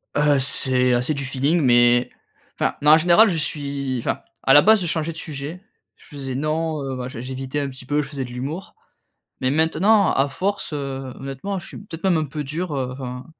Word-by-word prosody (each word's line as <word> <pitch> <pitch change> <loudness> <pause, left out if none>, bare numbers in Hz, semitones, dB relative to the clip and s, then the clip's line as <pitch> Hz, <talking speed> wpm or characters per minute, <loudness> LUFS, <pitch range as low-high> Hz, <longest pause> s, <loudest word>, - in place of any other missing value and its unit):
Heu, 145 -1 +3
c'est 130 -1 +2
assez 125 +5 +1
du 140 -1 -4
feeling, 140 +6 +1
mais 120 -1 +4 0.5
enfin, - - 0
non, 150 - +6
en 155 - +9
général, 175 +7 +6
je 170 - -1
suis 140 -4 -2
enfin, - - -2 0.2
à - - +4
la 145 - +9
base 220 -1 +5
je 175 - -2
changeais 160 0 -1
de 165 - -11
sujet, 155 +3 -6 0.4
je - - -20
faisais 140 -4 -7
non, 155 +1 -1
heu, 135 -1 -4
machin, 125 -2 -6
j'évitais 130 +2 -4
un 140 -1 -2
petit 130 -1 -11
peu, 145 +2 +1
je 140 - -6
faisais 135 -3 -4
de 120 - -10
l'humour, 140 +9 -6 0.7
mais 130 - +1
maintenant, 185 +7 +3
à 135 +1 +1
force, 195 +4 -3
heu, 135 -3 -5
honnêtement, 135 +9 -4
je - - -10
suis - - -9
peut-être 170 -5 -10
même 185 -3 +3
un 155 - 0
peu 150 +1 -5
dur, 155 +3 -4
heu, 130 -2 -2
enfin 125 -1 -7
145 Hz, 215 wpm, -22 LUFS, 130-160 Hz, 0.7 s, en